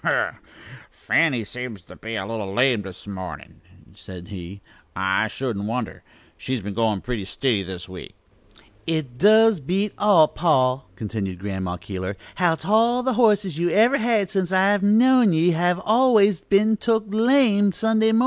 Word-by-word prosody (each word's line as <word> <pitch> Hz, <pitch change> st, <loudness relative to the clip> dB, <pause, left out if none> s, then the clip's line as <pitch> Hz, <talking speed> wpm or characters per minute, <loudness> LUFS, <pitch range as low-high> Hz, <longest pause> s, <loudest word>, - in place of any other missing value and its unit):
"A -, -, -4 dB
hem! -, -, +3 dB
a -, -, +2 dB
hem! -, -, -21 dB, 0.5 s
'Fanny' 135 Hz, -9 st, 0 dB
seems 120 Hz, -4 st, -8 dB
to -, -, -15 dB
be 115 Hz, 0 st, -7 dB
a 95 Hz, -3 st, -4 dB
little 105 Hz, -2 st, -5 dB
lame, 120 Hz, +1 st, +2 dB
this 95 Hz, -2 st, -11 dB
mornin'," 95 Hz, -4 st, -9 dB, 0.3 s
said 90 Hz, +1 st, -12 dB
he. 95 Hz, -1 st, -9 dB, 0.4 s
"I 95 Hz, +3 st, 0 dB
shouldn't 110 Hz, -3 st, -4 dB
wonder. 115 Hz, 0 st, -4 dB, 0.4 s
She's 130 Hz, -1 st, -4 dB
been 100 Hz, 0 st, -7 dB
goin' 110 Hz, -2 st, -1 dB
pretty 120 Hz, -5 st, -4 dB
stiddy 110 Hz, +2 st, -1 dB
this 90 Hz, -1 st, -8 dB
week." 90 Hz, -1 st, -11 dB, 0.7 s
"It 155 Hz, -7 st, -3 dB
does 220 Hz, 0 st, +5 dB
beat 190 Hz, +8 st, -2 dB
all, 190 Hz, -7 st, +5 dB
pa," 135 Hz, -6 st, +1 dB
continued 100 Hz, -2 st, -5 dB
Grandma 95 Hz, -2 st, -5 dB
Keeler, 95 Hz, +2 st, -6 dB, 0.2 s
"how 175 Hz, -3 st, +2 dB
't -, -, -11 dB
all 230 Hz, +4 st, +2 dB
the 260 Hz, 0 st, 0 dB
horses 210 Hz, -8 st, +1 dB
you've 175 Hz, 0 st, 0 dB
ever 240 Hz, +6 st, +3 dB
had 220 Hz, -4 st, 0 dB
since 190 Hz, -3 st, -2 dB
I've 195 Hz, +2 st, +2 dB
known 230 Hz, +1 st, +4 dB
ye 165 Hz, +3 st, +2 dB
have 175 Hz, +2 st, 0 dB
always 215 Hz, -5 st, +3 dB
been 215 Hz, +2 st, +2 dB
took 225 Hz, 0 st, 0 dB
lame 220 Hz, -2 st, +3 dB
Sunday 220 Hz, +2 st, +1 dB
mornin'. 225 Hz, -, +3 dB
160 Hz, 170 wpm, -22 LUFS, -, 0.7 s, does